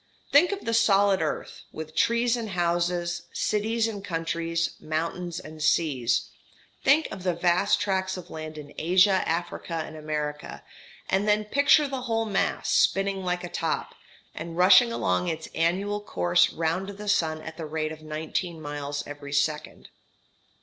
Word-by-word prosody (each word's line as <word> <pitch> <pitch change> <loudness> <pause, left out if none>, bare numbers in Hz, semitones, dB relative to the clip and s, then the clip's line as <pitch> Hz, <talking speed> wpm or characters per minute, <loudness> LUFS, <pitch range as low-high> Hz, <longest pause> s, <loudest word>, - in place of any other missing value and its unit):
Think 310 +7 +6
of 400 0 -5
the 230 - -1
solid 200 -4 +4
earth, 155 - -3
with 160 0 -8
trees 235 +6 +2
and 230 -3 -4
houses, 175 -1 -1
cities 220 +2 0
and 205 -3 -6
countries, 165 -1 -2
mountains 170 +2 -3
and 155 -3 -10
seas 150 -6 +1 0.5
think 295 +4 +4
of 190 - -7
the 180 -1 0
vast 175 +3 +2
tracts 190 -1 -1
of 180 - -10
land 155 0 -7
in 145 -1 -10
Asia, 185 +3 +4
Africa, 170 +1 -3
and - - -10
America 150 - -4 0.4
and 195 +2 +1
then 210 0 +2
picture 285 +5 +4
the 270 -2 -4
whole 225 -2 -1
mass 205 -3 -1
spinning 195 0 +2
like 180 -1 -1
a - - -4
top, 165 -2 -2 0.4
and 165 +1 -7
rushing 200 +7 +7
along 90 - 0
its 160 0 -4
annual 195 +5 0
course 90 - +2
round 170 +4 -1
the 205 +1 -8
sun 160 -6 +1
at 160 0 -8
the 160 -2 -5
rate 155 0 -2
of 155 0 -9
nineteen 160 +2 -4
miles 145 -1 -4
every 145 -1 -8
second. 150 +1 -1
175 Hz, 155 wpm, -26 LUFS, 155-200 Hz, 0.5 s, rushing